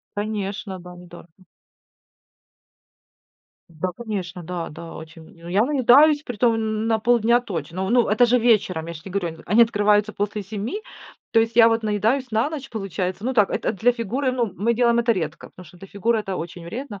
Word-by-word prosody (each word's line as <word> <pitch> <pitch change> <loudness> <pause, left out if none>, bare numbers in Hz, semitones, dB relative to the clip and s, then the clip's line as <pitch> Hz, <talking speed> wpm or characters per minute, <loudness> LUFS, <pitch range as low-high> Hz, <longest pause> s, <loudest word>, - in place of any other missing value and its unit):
Конечно, 205 -2 -4
да, 180 0 -11
недорого. 175 -1 -14 2.4
Да, 170 +2 -4
конечно, 195 -6 -5
да. 170 0 -5
Да, 165 +2 -10
очень, 160 +1 -11
м. - - -19
Ну, - - -8
я 195 +5 +2
наедаюсь, 290 +2 +5
притом 240 -3 +1
н 220 0 -2
на 225 -1 +2
полдня 235 +1 +3
точно. 185 -3 -4
Ну, 240 +1 +3
это 230 +4 +4
же 245 +1 +3
вечером, 210 -8 +2
я 170 - -6
ж 155 - -10
те 190 - -10
говорю. 170 -4 -4
Они 215 +5 +5
открываются 210 -1 +2
после 205 +1 -3
7. 220 - -5 0.5
То 225 - +5
есть 225 0 -1
я 230 -1 +8
вот 225 0 0
наедаюсь 220 +5 0
на 225 +6 +1
ночь, 280 -4 -6
получается. 195 -2 -4
Ну, 260 - 0
так 210 -6 +3
это - - -1
для 230 +4 +2
фигуры, 250 +4 -2
ну, 240 -6 -1
мы 235 +4 +1
делаем 235 0 +3
это 235 0 +3
редко, 170 -7 -5
потому 180 - -14
что 175 +3 -17
для 195 - -11
фигуры 225 +4 0
это 195 -3 -4
очень 170 0 -7
вредно. 215 +3 -7
215 Hz, 190 wpm, -22 LUFS, 185-235 Hz, 2.4 s, я